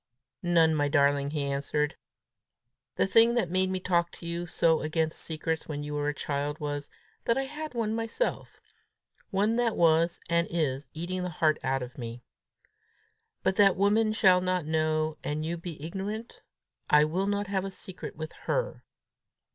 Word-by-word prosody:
"None, 170 -3 +4
my 145 -2 +2
darling," 140 -1 +3
he 150 -1 -2
answered. 145 +2 -1 1.0
"The - - +2
thing 230 +4 +5
that 185 -8 +1
made 185 0 +2
me 185 0 -1
talk 175 -2 +1
to - - -11
you 170 +1 -3
so 160 -1 +2
against 155 +1 -1
secrets 160 0 -3
when 145 -1 -4
you 150 0 -5
were 145 0 -1
a 150 - +1
child, 145 +1 -2
was, 145 -1 -4 0.4
that 230 - +2
I 270 - +1
had 300 +1 -6
one 220 -2 0
myself 230 - -2 0.7
one 210 +3 +1
that 240 -2 +1
was, 165 0 +3
and 170 0 +2
is, 145 -5 -1
eating 180 +3 -3
the 180 - -2
heart 155 -2 +1
out 135 0 0
of 125 +2 -9
me. 120 0 -6 1.2
But 190 - +1
that 195 -2 +6
woman 215 +3 +3
shall 190 -4 +5
not 180 -2 0
know 155 0 0
and 155 +1 -2
you 170 +2 -2
be 170 -2 -7
ignorant! 200 +8 -5 0.5
I 150 0 +7
will 180 +6 0
not 205 0 0
have 190 -1 -1
a 195 - -3
secret 190 -1 -9
with 155 +1 -6
_her! - - -1
170 Hz, 170 wpm, -29 LUFS, 150-195 Hz, 1.2 s, I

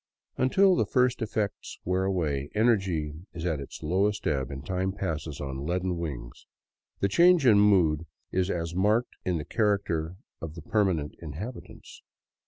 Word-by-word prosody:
Until 190 +9 +4
the - - +1
first 125 -1 +2
effects 105 -2 -3
wear 95 +1 +1
away, 75 -7 -1
energy 95 -9 +1 0.2
is 80 0 -5
at 80 -4 0
its 70 - -9
lowest 100 +6 0
ebb 65 -2 0
and 70 +1 -7
time 95 +2 -1
passes 80 -6 -4
on 70 -1 -4
leaden 90 +3 -1
wings. 65 -7 -6 0.5
The 100 - +3
change 170 - +5
in 110 -4 +7
mood 85 -6 +3 0.2
is 95 0 0
as 85 -2 -2
marked 105 +6 +2
as - - -2
in - - 0
the 75 - -5
character 95 -6 0 0.3
of 80 -1 -6
the 85 - -9
permanent 90 -8 0
inhabitants. 85 - -8
90 Hz, 160 wpm, -28 LUFS, 75-105 Hz, 0.5 s, in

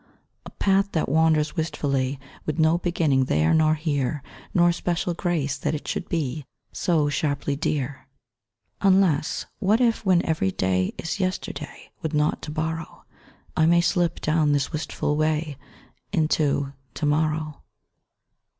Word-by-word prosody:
A - - -7
path 195 0 +1
that 160 - 0
wanders 155 +1 +2
wistfully 140 -5 -1 0.3
With 155 - -1
no 160 +1 +3
beginning 160 -7 +1
there 75 -7 +2
nor 155 -1 +4
here, 145 -3 -1 0.3
Nor 175 -3 +4
special 175 0 -1
grace 165 -5 -1
that 150 +1 -1
it 150 - -7
should - - -3
be 150 -3 -2 0.3
So 160 -4 +1
sharply 145 -1 -1
dear, 140 -2 -2 0.7
Unless, 185 -5 +3
what 210 +2 +3
if 230 -2 +2
when 185 -3 +3
every 155 - +1
day 95 0 0
Is 165 +5 -4
yesterday, 185 -1 -4
with 160 -1 -2
naught 150 0 +1
to - - -7
borrow, 160 +1 -4 0.5
I 160 - +4
may 170 +1 +5
slip 170 -1 +1
down 155 -1 +2
this 145 -1 0
wistful 150 -1 -2
way 155 -1 0 0.6
Into 145 -3 +1 0.2
to - - -2
morrow? 155 0 0
155 Hz, 140 wpm, -24 LUFS, 145-170 Hz, 0.7 s, may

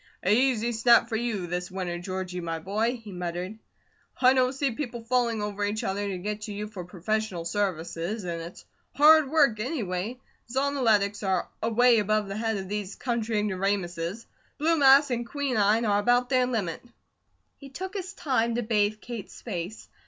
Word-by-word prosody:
"Easy 235 +2 +3
snap 235 +1 +5
for 225 - -2
you 220 -5 -2
this 180 +1 -3
winter, 180 -2 -4
Georgie, 185 0 -4
my 165 -1 -3
boy!" 215 +8 -1
he 210 - -9
muttered. 180 +3 -5 0.6
"I 255 0 +6
don't 255 -1 +3
see 270 0 -1
people 235 -2 -5
falling 235 -2 +1
over 205 0 -3
each 205 +1 -1
other 200 +1 -2
to 190 - -3
get 210 +3 -4
to 210 0 -5
you 210 +1 -4
for 210 -4 -7
professional 190 0 -2
services, 175 +1 -2
and 170 -2 -4
it's 170 +2 -10 0.3
hard 305 -1 +7
work 280 -8 +3
anyway. 220 - -3 0.3
Zonoletics 235 -7 +1
are 190 -3 0
away 230 +1 +4
above 210 0 +1
the 195 - -5
head 225 -1 -1
of 190 -1 -5
these 205 -1 -4
country 235 -3 -1
ignoramuses; 195 -1 -2 0.3
blue 325 +3 +2
mass 275 0 +6
and 240 -1 0
quinine 230 -6 +1
are 205 -1 +3
about 245 +3 +2
their 255 -2 +3
limit." 205 -10 -2 0.8
He 275 - -12
took 370 +8 -6
his 390 -1 -5
time 255 - 0
to 240 - -1
bathe 215 -1 +1
Kate's 235 -4 -8
face. 185 -1 -5
215 Hz, 170 wpm, -27 LUFS, 190-245 Hz, 0.8 s, hard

